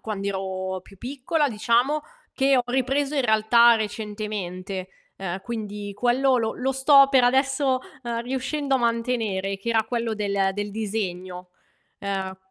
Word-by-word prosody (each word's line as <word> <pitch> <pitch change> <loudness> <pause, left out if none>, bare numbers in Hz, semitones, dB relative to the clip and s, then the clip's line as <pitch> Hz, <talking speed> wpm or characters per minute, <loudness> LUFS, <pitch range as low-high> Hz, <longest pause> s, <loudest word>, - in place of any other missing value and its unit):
quand'ero 190 -2 -3
più 195 - -17
piccola 280 - -1
diciamo, 240 +6 +1 0.3
che 270 -1 +3
ho 250 - +3
ripreso 270 +3 0
in 275 - +2
realtà 235 +1 +5
recentemente. 205 -3 -4 0.3
Uhm, 190 0 -4
quindi, 210 -3 -5
quello 250 +3 +2
lo 225 -1 -1
lo 265 +1 -1
sto, 275 +1 +6
per 260 -3 +5
adesso, 265 +1 +2 0.2
uhm, 235 -1 -3
riuscendo 270 +3 -2
a - - -1
mantenere, 230 -5 -1
che 235 - -6
era 225 -2 +2
quello 230 -1 -2
del 200 -2 0
del 205 0 -3
disegno. 185 -4 -4 0.5
Uhm 190 -1 -3
225 Hz, 140 wpm, -24 LUFS, 200-260 Hz, 0.5 s, sto